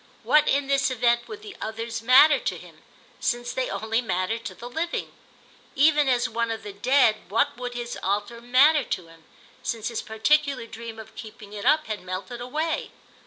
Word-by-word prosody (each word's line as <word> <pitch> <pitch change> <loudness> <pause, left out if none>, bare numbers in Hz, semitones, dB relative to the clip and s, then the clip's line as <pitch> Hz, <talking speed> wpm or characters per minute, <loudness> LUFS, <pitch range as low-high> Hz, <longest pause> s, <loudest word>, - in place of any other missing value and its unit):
What 300 0 +4
in 280 0 +2
this 275 -1 +2
event 240 -1 +1
would 430 -1 -9
the 415 -2 -9
Others 230 +1 -4
matter 265 +5 +7
to - - -3
him, - - -15 0.4
since 240 0 -1
they 260 -1 -1
only 225 +2 -1
mattered 220 +1 -2
to - - -6
the 240 - -9
living? 325 +7 -3 0.6
Even 295 0 +4
as 245 -1 +2
one 230 +1 -2
of 225 -2 -4
the 205 -1 -7
Dead 240 +1 +3
what 225 +4 +1
would 245 0 -6
his 240 0 -5
altar 205 +4 -2
matter 270 +5 +5
to 180 -7 -4
him, 165 -1 -19 0.4
since 225 -1 -3
his 230 - -3
particular 275 +4 +1
dream 230 0 -9
of 220 0 -11
keeping 215 -2 -11
it 205 -1 -6
up 310 0 +4
had 215 -1 -4
melted 185 +6 -6
away? 310 +6 -2
235 Hz, 185 wpm, -25 LUFS, 220-275 Hz, 0.6 s, matter